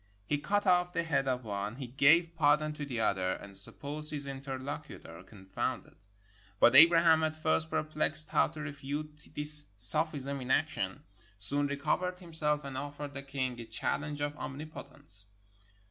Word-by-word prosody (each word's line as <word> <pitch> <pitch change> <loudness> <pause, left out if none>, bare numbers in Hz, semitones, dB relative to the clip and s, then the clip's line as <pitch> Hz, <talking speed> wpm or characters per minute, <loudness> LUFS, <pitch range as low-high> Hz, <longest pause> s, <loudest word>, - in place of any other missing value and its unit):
He 145 +7 -2
cut 205 +6 -1
off 180 0 +2
the 170 -2 -1
head 140 -4 -1
of 125 -1 -2
one, 105 0 -5
he 135 0 -7
gave 155 +7 +2
pardon 155 0 +1
to 150 -1 -7
the 120 -4 -4
other, 95 -4 0
and 100 -1 -11
supposed 145 +10 -2
his 145 -2 -4
interlocutor 135 -10 -8
confounded. 95 0 -6 0.7
But 120 - +5
Abraham, 165 +1 +6
at 155 0 -1
first 160 0 -1
perplexed 155 0 0
how - - +2
to 155 -1 -10
refute 150 +1 -7
this 150 0 +6
sophism 140 +3 +5
in 125 - -8
action, - - -1 0.3
soon 140 +9 +6
recovered 160 +6 -2
himself 155 -4 -2
and 135 -1 -6
offered 145 0 -8
the 140 - -7
king 130 -3 -4
a 115 - -8
challenge 145 +6 -4
of 145 0 -3
omnipotence. 135 -8 -4
145 Hz, 155 wpm, -30 LUFS, 130-155 Hz, 0.7 s, Abraham